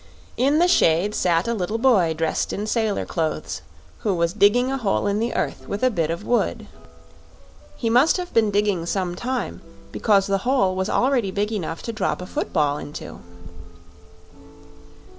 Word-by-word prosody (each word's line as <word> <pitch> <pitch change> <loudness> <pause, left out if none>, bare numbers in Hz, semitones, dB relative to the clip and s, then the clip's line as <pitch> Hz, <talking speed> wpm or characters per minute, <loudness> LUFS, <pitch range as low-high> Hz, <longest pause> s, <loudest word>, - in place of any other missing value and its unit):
In 275 +4 +2
the 350 +2 +4
shade 185 - +3
sat 170 -1 +1
a 235 - 0
little 210 +1 -2
boy 210 -10 +3
dressed 160 -1 -1
in 205 - -3
sailor 215 -2 0
clothes, 160 -3 -3 0.4
who 205 -5 0
was 170 0 0
digging 220 +5 +3
a 270 - -1
hole 205 -4 0
in 205 +1 0
the 230 +2 -2
earth - - -3
with 205 +4 -4
a 255 - +4
bit 165 -7 -1
of 170 +5 -4
wood. 240 -4 0 1.1
He 230 - -2
must 250 +10 +4
have 360 -1 -6
been 225 -2 +3
digging 200 -4 0
some 180 -1 -1
time, 250 +7 -4 0.3
because 200 -3 +2
the 195 0 0
hole 195 -5 +1
was 190 +1 -1
already 250 -5 +1
big 205 +3 -2
enough 170 -6 -4
to 230 - -4
drop 215 - -1
a 180 - -6
football 150 -5 -1
into. 145 - -8
205 Hz, 170 wpm, -22 LUFS, 180-235 Hz, 1.1 s, the